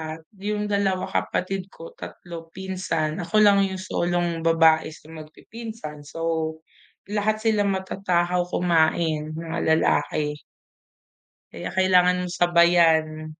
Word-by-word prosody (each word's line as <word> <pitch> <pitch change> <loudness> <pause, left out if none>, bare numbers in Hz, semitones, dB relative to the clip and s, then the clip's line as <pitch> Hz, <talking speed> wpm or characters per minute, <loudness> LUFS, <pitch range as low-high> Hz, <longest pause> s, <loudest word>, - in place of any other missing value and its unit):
at 165 - -14 0.2
yung 210 +1 -2
2 195 -2 +1
kapatid 190 +1 -2
ko, 165 -4 -12
3 170 -2 -9
pinsan, 170 -4 -3
ako 215 +5 +2
lang 200 -1 +6
yung 190 0 -5
solong 175 -2 -1
babae 160 -1 +4
sa 155 0 -14
magpipinsan 160 +1 -9
so, 160 -1 -2 0.6
lahat 215 +1 0
sila 210 -2 +2
matatakaw 180 -2 0
kumain, 160 -3 +1
mga 165 0 -4 0.2
lalaki. 150 -1 0 1.1
Kaya 85 - -6
kailangan 180 -1 +4 0.2
sabayan. 165 -3 +3
175 Hz, 105 wpm, -24 LUFS, 160-190 Hz, 1.1 s, lang